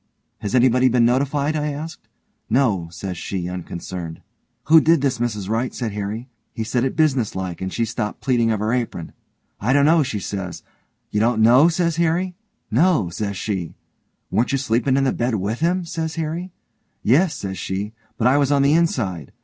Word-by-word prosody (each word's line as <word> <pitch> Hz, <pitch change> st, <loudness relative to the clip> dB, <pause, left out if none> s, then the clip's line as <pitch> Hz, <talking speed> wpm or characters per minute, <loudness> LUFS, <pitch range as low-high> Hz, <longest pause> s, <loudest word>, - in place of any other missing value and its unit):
'Has 105 Hz, +2 st, -2 dB
anybody 125 Hz, +1 st, +4 dB
been 120 Hz, -1 st, +3 dB
notified?' 140 Hz, +4 st, +1 dB
I 150 Hz, 0 st, -1 dB
asked. 155 Hz, +3 st, -8 dB, 0.4 s
'No', 110 Hz, -9 st, +2 dB
says 90 Hz, +1 st, -6 dB
she 90 Hz, -3 st, -3 dB
unconcerned. 90 Hz, -1 st, -6 dB, 0.4 s
'Who 160 Hz, +2 st, +7 dB
did 165 Hz, -2 st, +4 dB
this, 135 Hz, -4 st, 0 dB
Mrs 105 Hz, -5 st, -2 dB
Wright?' 115 Hz, +4 st, -1 dB
said 115 Hz, -4 st, -3 dB
Harry. 105 Hz, +4 st, -4 dB, 0.3 s
He 110 Hz, -, -3 dB
said 120 Hz, +2 st, 0 dB
it 135 Hz, -, -1 dB
business 135 Hz, -8 st, +1 dB
like 95 Hz, -2 st, -4 dB
and 95 Hz, 0 st, -3 dB
she 115 Hz, -, 0 dB
stopped 110 Hz, -1 st, -4 dB
pleatin' 120 Hz, -3 st, +1 dB
of 110 Hz, -2 st, 0 dB
her 110 Hz, +2 st, 0 dB
apron. 115 Hz, -9 st, -3 dB, 0.5 s
'I 120 Hz, +6 st, +1 dB
don't 140 Hz, 0 st, +4 dB
know', 160 Hz, +1 st, +5 dB
she 120 Hz, -7 st, -2 dB
says. 95 Hz, -3 st, -5 dB, 0.5 s
'You 105 Hz, -, 0 dB
don't 115 Hz, +1 st, +2 dB
know?' 125 Hz, +7 st, +7 dB
says 170 Hz, -1 st, 0 dB
Harry. 170 Hz, +2 st, +1 dB, 0.4 s
'No', 150 Hz, -, +3 dB
says 100 Hz, +2 st, -4 dB
she. 95 Hz, -6 st, -3 dB, 0.6 s
'Weren't 120 Hz, +5 st, +1 dB
you 135 Hz, -, +2 dB
sleepin' 130 Hz, +1 st, +1 dB
in 135 Hz, -, +2 dB
the 135 Hz, -, +2 dB
bed 120 Hz, -1 st, 0 dB
with 105 Hz, +4 st, -2 dB
him?' 175 Hz, +2 st, +1 dB
says 160 Hz, -2 st, -4 dB
Harry. 165 Hz, +3 st, -3 dB, 0.5 s
'Yes', 155 Hz, -, +3 dB
says 95 Hz, -1 st, -5 dB
she, 100 Hz, +3 st, -3 dB, 0.2 s
'but 110 Hz, -, -1 dB
I 130 Hz, +3 st, +5 dB
was 140 Hz, -1 st, +2 dB
on 140 Hz, -1 st, +4 dB
the 140 Hz, +2 st, +4 dB
inside'. 110 Hz, -, 0 dB
120 Hz, 190 wpm, -21 LUFS, 105-145 Hz, 0.6 s, Who